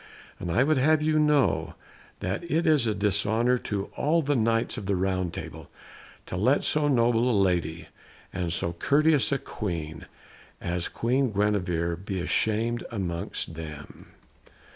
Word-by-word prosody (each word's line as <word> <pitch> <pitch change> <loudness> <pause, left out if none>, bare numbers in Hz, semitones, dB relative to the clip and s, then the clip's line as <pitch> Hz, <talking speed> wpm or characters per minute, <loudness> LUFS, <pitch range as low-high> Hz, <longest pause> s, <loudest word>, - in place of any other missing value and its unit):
And 85 - -4
I 120 - +3
would 155 -1 +2
have 155 +3 +3
you 155 0 +2
know 150 -3 +2 0.5
that 95 - -2
it 165 +2 +1
is 150 -7 +3
a 110 - 0
dishonour 110 +5 +2
to 100 -3 -4
all 160 +3 +1
the 145 +1 +1
Knights 115 -1 +1
of 105 -6 -6
the 100 - +1
Round 95 -1 -1
Table - - -8 0.6
to - - -6
let - - +2
so 150 -1 +2
noble 120 -2 +3
a 115 - +2
lady 85 -3 0 0.5
and 90 -2 -2
so 85 0 -1
courteous 145 - +3
a 140 - +2
Queen 85 - -5 0.5
as 85 0 -2
Queen 125 +1 0
Guenevere 90 -5 0
be 95 -1 -4
shamed 115 +2 0
amongst 85 -5 -4
them." 75 -2 -9
105 Hz, 150 wpm, -26 LUFS, 90-135 Hz, 0.6 s, I